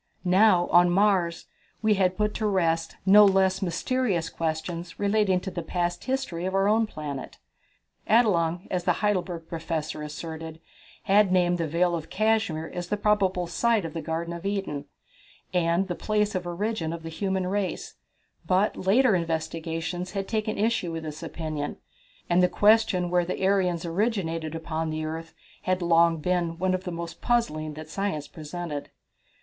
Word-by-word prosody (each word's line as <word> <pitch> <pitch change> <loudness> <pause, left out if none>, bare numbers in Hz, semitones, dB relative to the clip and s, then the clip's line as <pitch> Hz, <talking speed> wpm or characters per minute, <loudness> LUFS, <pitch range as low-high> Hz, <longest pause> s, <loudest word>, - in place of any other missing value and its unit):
Now, 185 -1 +5
on 175 0 +6
Mars, 185 -3 +2 0.4
we 215 -1 +4
had 185 -2 +1
put 210 0 0
to 215 - -1
rest 165 -4 0
no 205 +2 +8
less 190 -1 +3
mysterious 185 -1 -1
questions 165 +1 -4
relating 200 -2 +2
to 190 - -5
the 175 - -4
past 175 +1 -2
history 260 -10 -2
of 190 +1 -2
our 195 +1 +3
own 220 +1 +3
planet. 145 -8 -6 0.7
Adelung, 175 -7 +3
as 180 -1 -1
the - - +4
Heidelberg 180 -5 -1
Professor 160 -2 -4
asserted, 160 +1 -7 0.4
had 200 0 +4
named 175 -1 +2
the 165 - 0
Vale 175 +3 +1
of 165 -2 -4
Cashmere 215 -7 0
as 175 -1 -4
the 210 - -1
probable 195 -4 +2
site 215 +4 +1
of 165 - -6
the 165 - -4
Garden 165 +2 -3
of 170 0 -7
Eden, 195 -8 -3 0.7
and 175 +1 +2
the 180 - -2
place 210 +2 0
of 180 -2 -3
origin 175 -2 -2
of 165 -1 -7
the 165 - -5
human 190 +2 -1
race, 190 -1 -2 0.5
but 190 +4 +2
later 225 +5 +3
investigators 165 +1 -3
had 195 -1 -3
taken 215 -1 -1
issue 215 -5 0
with 165 0 -5
this 155 -1 -7
opinion, 155 -3 -4 0.5
and 175 +1 +3
the 180 - +4
question 205 -5 +3
where 180 0 +3
the 185 +2 -2
Aryans 180 -4 +1
originated 165 -4 -1
upon 160 0 -3
the 155 0 -3
earth 165 +1 -6 0.3
had 185 -1 0
long 170 -1 +4
been 170 +1 -1
one 185 +1 +1
of 185 0 -2
the 180 - -3
most 170 0 -6
puzzling 155 -11 0
that 155 0 -8
science 155 -5 -3
presented. 155 -1 -6
175 Hz, 165 wpm, -26 LUFS, 165-200 Hz, 0.7 s, no